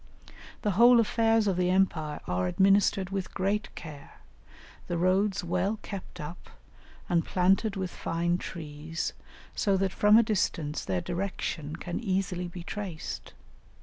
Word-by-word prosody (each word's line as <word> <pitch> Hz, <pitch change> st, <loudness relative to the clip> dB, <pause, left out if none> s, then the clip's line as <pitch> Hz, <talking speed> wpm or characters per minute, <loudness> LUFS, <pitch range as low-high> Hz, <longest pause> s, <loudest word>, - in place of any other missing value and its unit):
The 210 Hz, -, +2 dB
whole 235 Hz, +5 st, +7 dB
affairs 225 Hz, 0 st, +3 dB
of 195 Hz, -3 st, +1 dB
the 180 Hz, 0 st, +2 dB
empire 170 Hz, -5 st, +1 dB
are 90 Hz, 0 st, 0 dB
administered 195 Hz, -, +3 dB
with 195 Hz, -2 st, -4 dB
great 200 Hz, +2 st, 0 dB
care, 150 Hz, -3 st, -10 dB, 0.7 s
the 175 Hz, -, -1 dB
roads 190 Hz, +3 st, +2 dB
well 180 Hz, +5 st, 0 dB
kept 200 Hz, -3 st, -7 dB
up 150 Hz, +4 st, -8 dB, 0.6 s
and 170 Hz, -3 st, +2 dB
planted 195 Hz, +3 st, +2 dB
with 190 Hz, -2 st, -3 dB
fine 170 Hz, +1 st, -1 dB
trees, 155 Hz, -1 st, -5 dB, 0.4 s
so 200 Hz, -2 st, +1 dB
that 190 Hz, 0 st, 0 dB
from 210 Hz, +1 st, +6 dB
a 235 Hz, -, +6 dB
distance 165 Hz, -8 st, -1 dB
their 90 Hz, -2 st, -1 dB
direction 175 Hz, -4 st, -3 dB
can 175 Hz, +1 st, -4 dB
easily 185 Hz, -4 st, -1 dB
be 175 Hz, 0 st, -8 dB
traced. 190 Hz, -4 st, -6 dB
185 Hz, 140 wpm, -29 LUFS, 170-200 Hz, 0.7 s, whole